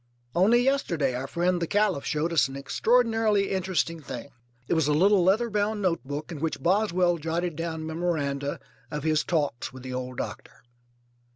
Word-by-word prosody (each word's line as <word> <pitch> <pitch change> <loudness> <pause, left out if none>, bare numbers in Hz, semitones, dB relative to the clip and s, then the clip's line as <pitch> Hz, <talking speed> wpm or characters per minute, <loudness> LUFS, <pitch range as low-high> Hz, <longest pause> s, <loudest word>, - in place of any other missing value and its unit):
Only 225 +7 +4
yesterday 170 - +1
our 130 +2 -3
friend 175 +3 0
the 170 - 0
Caliph 205 -7 +1
showed 160 +3 -1
us 145 -6 +4
an 135 - -9
extraordinarily 220 - +2
interesting 185 -3 -1
thing. 140 - -7 0.4
It - - +1
was 160 -3 +2
a 150 - +3
little 195 +3 +4
leather 215 +6 +2
bound 210 +1 0
notebook 155 -5 -2
in 160 - -6
which 160 +1 -3
Boswell 180 -2 +2
jotted 165 +2 -2
down 160 0 -4
memoranda 155 -4 -2 0.3
of 150 -2 -4
his 155 -1 +2
talks 145 -8 -1
with 130 -1 -11
the 130 -1 -6
old 125 0 -5
doctor. - - -7
170 Hz, 170 wpm, -27 LUFS, 150-195 Hz, 0.4 s, Only